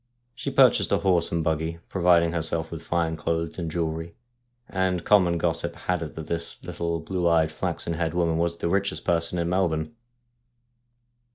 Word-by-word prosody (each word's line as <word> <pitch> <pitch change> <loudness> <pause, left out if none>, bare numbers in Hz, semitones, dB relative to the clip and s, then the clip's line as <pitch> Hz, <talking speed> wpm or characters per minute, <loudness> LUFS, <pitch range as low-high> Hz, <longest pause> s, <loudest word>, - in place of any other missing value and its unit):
She - - -4
purchased - - +4
a - - +4
horse 90 -4 +2
and 85 -1 0
buggy, 80 +1 -1
provided 85 -2 +3
herself 80 -1 0
with 80 -1 -6
fine 85 -1 -1
clothes 80 +2 -2
and 85 -2 -3
jewellery, 80 0 -3 0.5
and 95 -2 -1
common 90 -5 +4
gossip - - -1
had 90 -2 -2
it 80 - -6
that 80 - -6
this 85 0 -4
little, 85 -1 -3
blue 90 +1 -1
eyed, 80 -2 +3
flaxen 85 +1 -3
haired 80 0 -2
woman 85 -2 +1
was 85 0 0
the - - -2
richest 100 +3 -1
person 85 +1 +1
in 85 -1 0
Melbourne. 85 +1 0
85 Hz, 170 wpm, -25 LUFS, 80-85 Hz, 0.5 s, purchased